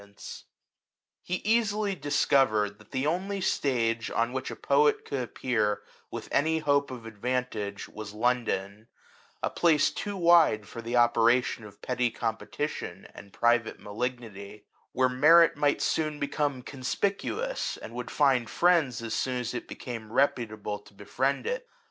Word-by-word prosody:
LIFE 100 - -15
OF 100 - -27
THOMSONi - - -19
IX - - -8 0.8
He 180 - -3
easily 215 -2 +2
discovered 120 - +2
that 105 - -18
the 130 +1 -2
only 190 +5 -1
stage 115 -10 0
on 115 +2 0
which 130 0 -3
a - - -6
poet 145 +1 +2
could 140 -2 -2
appear, 110 -4 -1 0.3
with - - -6
any 160 +2 +2
hope 145 -2 +1
of 125 -3 -8
advantage, 110 -2 -3
was 105 -1 -8
London; 110 -3 -1 0.6
a - - 0
place 155 -4 +3
too 205 -1 -4
wide 170 - +5
for 115 - -8
the 115 +2 -3
operation 120 0 +3
of 100 -1 -15
petty 125 -1 0
compe 115 -1 -4
tition 150 +1 -5
and 100 - -12
private 120 +1 +1
malignity; 105 -2 -6 0.3
where 130 0 +2
merit 155 +6 +6
might 145 0 +1
soon 155 -2 0
become 145 -2 -1
conspicuous, 200 - -2
and - - -9
would - - -5
find 135 -5 +2
friends 160 -10 +2
as 115 -1 -4
soon 130 -1 -1
as 125 -1 -3
it 120 - -5
became 115 -3 -7
reputable 110 -6 0
to 105 - -20
befriend 130 +7 -1
it. - - -3
125 Hz, 155 wpm, -28 LUFS, 110-150 Hz, 0.8 s, merit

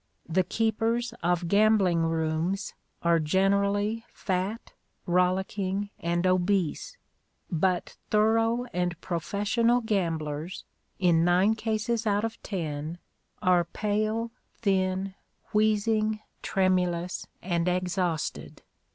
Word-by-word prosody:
The 180 +3 +2
keepers 225 +3 0
of 175 0 +1
gambling 200 -3 +4
rooms 165 +4 -1 0.3
are 170 -1 +4
generally 200 +6 +1
fat, 190 +4 -3 0.3
rollicking, 190 +2 0
and 170 +1 0
obese; 185 - +1 0.5
but 180 +1 0
thorough 225 +3 +3
and 175 -1 -1
professional 210 +7 +1
gamblers, 165 -6 -2 0.3
in 170 -3 +3
nine 180 +5 +4
cases 225 +1 -1
out 205 +1 +2
of 225 0 -6
ten, 160 -4 -4 0.5
are 180 -1 +4
pale, 215 +5 -1 0.2
thin, 190 -2 0 0.4
wheezing, 215 0 +2 0.2
tremulous, 180 -2 0 0.2
and 175 -1 0
exhausted. 180 -2 -2
190 Hz, 90 wpm, -28 LUFS, 175-215 Hz, 0.5 s, gambling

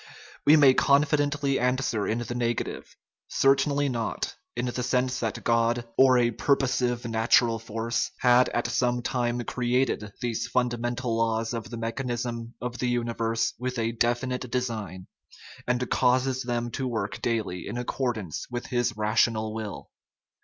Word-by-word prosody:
We 150 - +9
may 140 -3 +7
confidently 145 0 +2
answer 125 -4 0
in 110 - 0
the 120 0 -4
negative 120 -1 -3 0.3
certainly 140 +1 +2
not, 115 -4 -2 0.2
in 120 +1 -1
the 125 0 -2
sense 125 +1 0
that 115 -3 -3
God, 115 0 +1
or 130 -1 +6
a 120 -1 +3
purposive 125 -2 +1
natural 115 0 +3
force, 115 +1 -2
had 125 0 +5
at 120 - -1
some 120 -1 0
time 120 -1 -1
created 120 -3 0
these 120 -3 -2
fundamental 120 -1 -1
laws 115 0 0
of 115 -1 -5
the 120 - -6
mechan 115 +3 -3
ism 120 -1 -4
of 125 0 -5
the 125 - 0
universe 115 -1 0
with 125 0 -3
a 115 0 0
definite 120 +2 -1
design, 110 -7 -3 0.6
and 125 0 0
causes 130 +1 +2
them 120 -1 -2
to 130 +3 -2
work 105 -5 -3
daily 105 -7 -2
in 110 - -4
accordance 120 - -3
with 120 0 -4
his 120 -3 -1
rational 110 0 +1
will. 110 -2 -6
120 Hz, 145 wpm, -27 LUFS, 115-125 Hz, 0.6 s, We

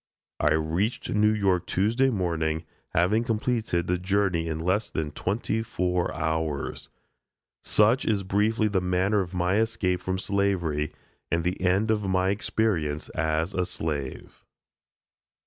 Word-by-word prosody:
I 75 - +3
reached 85 +9 -1
New 105 0 +4
York 95 -4 +1
Tuesday 115 +8 +2
morning, 80 -7 -1 0.3
having 95 +7 +3
completed 110 -6 0
the 90 0 0
journey 95 -3 +1
in 80 -1 -2
less 95 +6 0
than 75 -2 -3
twenty 110 +3 -1
four 90 -5 -1
hours. 80 -2 -2 0.7
Such 110 +5 +3
is 105 -3 +1
briefly 105 +3 +1
the 100 -3 +1
manner 90 +3 +1
of 90 0 -6
my 90 +3 +1
escape 110 -5 0
from 95 0 -2
slavery 95 -7 0 0.4
and 85 0 +1
the 90 +2 -2
end 95 +4 +2
of 110 -1 +1
my 95 0 +2
experience 95 -7 -1
as 80 +3 -1
a 90 - +1
slave. 75 -7 -5
95 Hz, 135 wpm, -26 LUFS, 85-105 Hz, 0.7 s, New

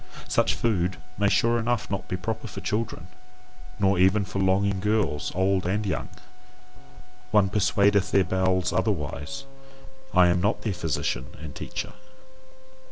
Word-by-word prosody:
Such - - +2
food 95 -5 0 0.2
may 100 0 +3
sure 115 +2 +3
enough 115 -2 -1
not 100 - -3
be 90 - -2
proper 110 +5 -4
for 95 - -7
children, 105 -4 -3 0.7
nor 100 -2 +2
even 95 +2 +4
for 100 0 -4
longing 95 +1 +2
girls 95 -9 0
old 95 -1 +1
and 105 +3 0
young. 95 - -2 1.2
One 100 -2 +4
persuadeth 100 -1 +3
their 100 - +4
bowels 95 0 +1
otherwise; 95 - -2 0.7
I - - +6
am 90 0 +2
not 105 +4 0
their 105 - -1
physician 75 -6 -2
and 75 -1 -8
teacher. - - -5
95 Hz, 140 wpm, -26 LUFS, 90-105 Hz, 1.2 s, I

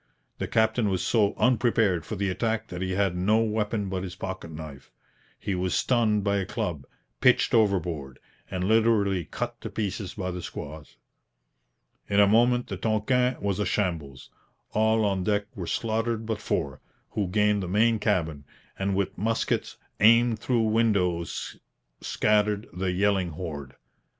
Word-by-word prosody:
The - - -2
captain 110 -1 +2
was 95 -2 -1
so 105 -3 +2
unprepared 115 -7 +2
for 110 - -4
the 100 0 -1
attack 115 +3 -1
that 90 0 -6
he 95 0 -1
had 95 -2 +1
no 100 +5 +2
weapon 105 -1 -1
but 95 -1 -3
his 90 -1 -6
pocket 95 -3 -6
knife. 75 -3 -9 0.5
He 100 - -3
was 90 0 -1
stunned 110 -5 +2
by 100 0 +1
a 95 - -1
club, 75 -9 -3 0.3
pitched - - +4
overboard, 85 - +1 0.3
and 90 -1 -3
literally 105 -4 +2
cut 120 +8 -5
to - - -5
pieces 100 -2 -4
by 95 -3 -3
the 90 0 -5
squaws. 75 -1 -8 1.1
In 100 - +3
a 100 - +8
moment 120 +4 +3
the 95 - -5
Tonquin 125 +5 +1
was 100 -1 -1
a 105 - +1
shambles. 80 -9 -2 0.4
All 110 0 +2
on 95 -2 0
deck 105 +1 +1
were 90 -6 -5
slaughtered 115 0 -1
but 110 -1 -3
four, 70 -2 -2 0.3
who 100 -3 -1
gained 105 +2 +2
the 90 - -4
main 110 +4 +3
cabin, 80 -9 -1 0.3
and 95 0 0
with 100 -1 -1
muskets 115 +3 -1 0.2
aimed 115 +1 +5
through 120 0 +1
windows 100 -6 0 0.4
scattered 105 0 +1
the 90 +1 -1
yelling 95 -1 +1
horde. 75 -5 -6
100 Hz, 155 wpm, -26 LUFS, 90-110 Hz, 1.1 s, a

